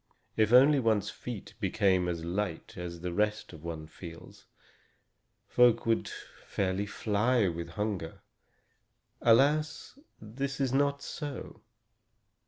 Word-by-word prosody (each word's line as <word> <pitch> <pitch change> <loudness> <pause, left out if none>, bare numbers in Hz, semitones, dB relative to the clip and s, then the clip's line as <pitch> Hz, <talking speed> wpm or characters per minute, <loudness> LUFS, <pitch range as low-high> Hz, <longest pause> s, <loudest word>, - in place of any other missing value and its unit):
If 110 -1 +3
only 135 +4 +7
one's 110 -4 +1
feet 120 -5 -7
became 95 -4 +2
as 85 -2 -3
light 90 -1 -3
as 85 -1 -6
the 90 -1 -3
rest 105 0 -1
of 80 -1 -12
one 80 -2 -5
feels, 85 +1 -12 1.0
folk 125 -2 +5
could 115 -1 +1 0.4
fairly 100 +1 -1
fly 105 +2 +1
with 85 -1 -4
hunger. 105 -6 -4 1.0
Alas! 150 - +3 0.2
this 135 +6 -4
is 135 -2 0
not 140 +1 +1
so. 145 -5 -6
105 Hz, 115 wpm, -30 LUFS, 90-125 Hz, 1.0 s, only